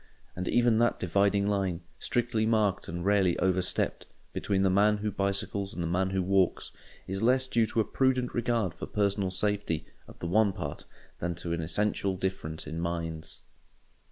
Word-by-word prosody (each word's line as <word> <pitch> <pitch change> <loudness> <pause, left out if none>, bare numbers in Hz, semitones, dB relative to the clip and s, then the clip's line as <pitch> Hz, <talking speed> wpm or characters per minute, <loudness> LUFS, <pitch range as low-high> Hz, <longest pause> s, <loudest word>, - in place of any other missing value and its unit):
And 90 0 -4
even 120 -2 +3
that 120 0 +2
dividing 100 +3 +2
line—strictly 105 +5 -1
marked 105 -3 +1
and 85 +2 -4
rarely 100 -3 +3
overstepped—between 95 +1 -1
the 95 - +3
man 105 +2 +4
who 105 0 -2
bicycles 100 0 -1
and 85 - -3
the - - -1
man 95 +3 +1
who 95 -1 0
walks, 95 -1 +1 0.3
is 95 +1 -3
less 130 +3 +3
due 115 -3 +2
to 110 - +1
a - - -1
prudent 130 -2 +1
regard 120 -6 0
for - - -7
personal 100 -2 0
safety 95 -4 0 0.2
of - - -13
the - - -6
one 100 +3 +3
part - - -5 0.3
than 85 0 -2
to 85 0 -4
an 85 - -2
essential 100 +2 0
difference 95 -4 -3
in 80 +2 -5
minds. 85 -2 -4
100 Hz, 165 wpm, -29 LUFS, 90-105 Hz, 0.3 s, man